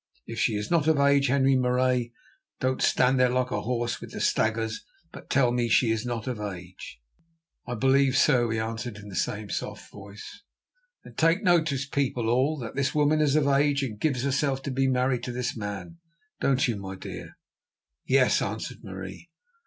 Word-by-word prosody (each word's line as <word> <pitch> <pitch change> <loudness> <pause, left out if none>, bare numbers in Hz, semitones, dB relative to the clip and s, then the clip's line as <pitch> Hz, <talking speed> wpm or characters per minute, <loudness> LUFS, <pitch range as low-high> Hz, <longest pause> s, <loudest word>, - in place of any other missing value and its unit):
Is 115 -1 -6
she 110 -2 +1
not 165 -3 +2
of 160 -2 +4
age, 140 0 +4
Henri 135 0 +3
Marais? 125 -1 +1 0.5
Don't 130 0 -1
stand 130 +1 +3
there 125 -1 +4
like 125 0 0
a - - -1
horse 120 0 -2
with - - -8
the - - -5
staggers, 110 - 0 0.3
but - - -12
tell 130 -3 +3
me; 120 -1 0
is 115 - +1
she 115 -3 +3
not 120 -2 -3
of 125 -4 -4
age?" 90 -9 -8 0.7
"I 120 - -3
believe 135 +2 +3
so," 120 -5 +3
he 110 - -1
answered 110 0 -4
in 105 -1 -11
the 95 - -8
same 105 +2 -2
soft - - -5
voice. 100 - -11 0.6
"Then - - -13
take 165 +6 +2
notice, 155 -7 +2
people 125 -5 -1
all, 130 +6 +2
that 115 -4 -6
this 140 +1 -1
woman 150 +1 +3
is 145 -2 +2
of 155 -2 +3
age, 140 0 +2
and 110 -6 -5
gives 135 -3 0
herself 140 -1 0
to 140 - -3
be 135 +1 +1
married 125 -1 +1
to 125 - -4
this 125 0 -3
man, 105 +9 -6 0.4
don't 135 0 +2
you, 115 -3 -1
my 95 -1 -7
dear?" 95 - -9 0.7
"Yes," 130 -1 +3
answered - - -4
Marie. - - -8
125 Hz, 185 wpm, -26 LUFS, 115-140 Hz, 0.7 s, of